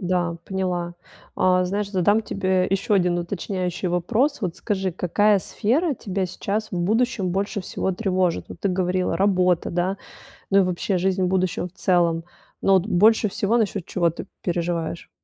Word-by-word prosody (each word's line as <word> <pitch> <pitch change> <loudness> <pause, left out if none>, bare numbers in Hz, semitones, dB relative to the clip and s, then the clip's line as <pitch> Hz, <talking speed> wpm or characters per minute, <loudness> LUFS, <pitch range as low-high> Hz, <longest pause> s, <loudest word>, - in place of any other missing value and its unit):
Да, 175 -2 0
поняла. 180 -2 -2 0.4
А, 185 0 +3
знаешь, 200 +2 -2
задам 205 +3 +3
тебе 190 -3 0
ещё 195 +2 +1
1 180 -2 +2
уточняющий 180 0 -3
вопрос. 225 - +1
Вот 180 -5 -3
скажи, 190 -4 -2
какая 200 +4 +2
сфера 275 - 0
тебя 195 -4 -3
сейчас 210 +4 -3
в 180 - -3
будущем 215 0 +1
больше 200 +2 -1
всего 190 +1 -2
тревожит? 185 -3 0
Вот - - -10
ты 200 - 0
говорила: 185 0 0
"Работа", 185 -3 +2
да, 180 +3 0 0.5
ну 195 - +5
и - - +6
вообще 185 +1 0
жизнь 190 +1 +1
в - - +2
будущем 185 0 0
в 180 - -19
целом. 170 -3 +1 0.4
Но 195 - +4
вот 190 -1 +4
больше 215 +2 +4
всего 205 +4 +1
насчёт 205 -5 -1
чего 170 -3 +1
ты 165 - -7 0.2
переживаешь? 170 -1 -2
185 Hz, 165 wpm, -23 LUFS, 180-200 Hz, 0.5 s, и